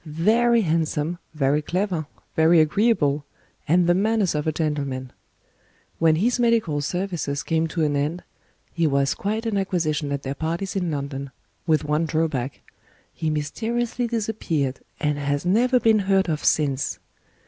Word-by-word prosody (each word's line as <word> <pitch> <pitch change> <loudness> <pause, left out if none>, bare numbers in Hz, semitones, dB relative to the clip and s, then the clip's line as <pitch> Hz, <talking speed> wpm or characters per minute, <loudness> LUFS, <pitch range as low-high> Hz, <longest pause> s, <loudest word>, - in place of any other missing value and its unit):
Very 225 +10 +3
handsome, 165 -1 -1 0.2
very 145 0 +2
clever, 175 -1 -2 0.3
very 160 +1 +5
agreeable, 155 -4 +2 0.4
and 175 +3 +4
the 175 - +4
manners 205 0 +1
of 150 0 -2
a - - +3
gentleman. 140 -5 -3 0.9
When 160 -1 +4
his 240 +9 +1
medical 225 -11 +2
services 170 -4 -2
came 165 0 0
to 160 0 -1
an 145 -1 +1
end, 150 +5 -1 0.5
he 165 -1 +1
was 140 -1 +2
quite 215 +3 -3
an 215 -3 0
acquisition 160 -6 -1
at 140 -1 -3
their 135 - -3
parties 165 +7 -3
in 180 -3 0
London 140 -2 -4 0.4
with 155 -2 +3
one 150 +2 0
drawback: 150 -5 -1 0.5
he 160 -2 -2
mysteriously 225 +11 -2
disappeared, 205 - -2 0.2
and 150 -1 0
has 145 +2 -1
never 245 +7 +3
been 225 -2 +4
heard 195 -1 +2
of 155 -2 -2
since. 140 -3 +1
160 Hz, 150 wpm, -23 LUFS, 145-195 Hz, 0.9 s, very